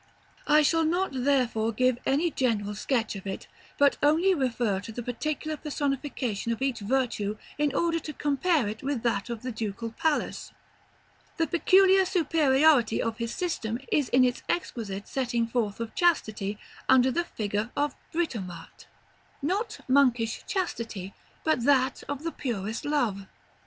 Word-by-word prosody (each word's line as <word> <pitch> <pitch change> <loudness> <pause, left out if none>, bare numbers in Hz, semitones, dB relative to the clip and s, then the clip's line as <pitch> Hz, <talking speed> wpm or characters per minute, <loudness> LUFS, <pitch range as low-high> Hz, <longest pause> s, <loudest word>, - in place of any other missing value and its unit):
I 300 +1 +6
shall 325 +2 +3
not 350 +4 +1
therefore 250 -4 +1
give 255 +2 +1
any 310 +5 +2
general 215 -7 0
sketch 225 +1 -1
of 195 0 -7
it, 190 - -5 0.3
but 285 -1 +4
only 325 +6 +4
refer 240 - 0
to 200 +3 -8
the 240 +2 -6
particular 305 +6 -3
personification 275 -7 -2
of 230 - -2
each 270 -3 0
virtue 215 -2 -1 0.2
in 295 -2 +1
order 330 +2 +1
to 310 - -6
compare 290 - +1
it 215 +2 -5
with 270 -3 -2
that 230 -2 0
of 235 -1 -5
the 255 - -3
Ducal 220 0 -4
Palace. 305 +6 -1 0.8
The 330 - +2
peculiar 380 +4 +5
superiority 305 - +3
of 225 0 -2
his 230 0 -3
system 235 -11 -2
is 290 -4 +2
in 255 +1 +5
its 245 0 -1
exquisite 210 - -3
setting 240 -3 0
forth 230 -3 -2
of 230 -1 -5
Chastity 215 - +1 0.3
under 260 0 +6
the 345 +6 0
figure 210 -4 -2
of 290 -1 +1 0.2
Britomart; 200 - -4 0.6
not 425 +8 -1
monkish 250 -4 +3
chastity, 230 - -3 0.3
but 315 -7 +1
that 265 -2 +3
of 285 +1 -4
the 330 - -2
purest 225 -6 -4
Love. 230 -10 0
255 Hz, 150 wpm, -27 LUFS, 225-300 Hz, 0.8 s, I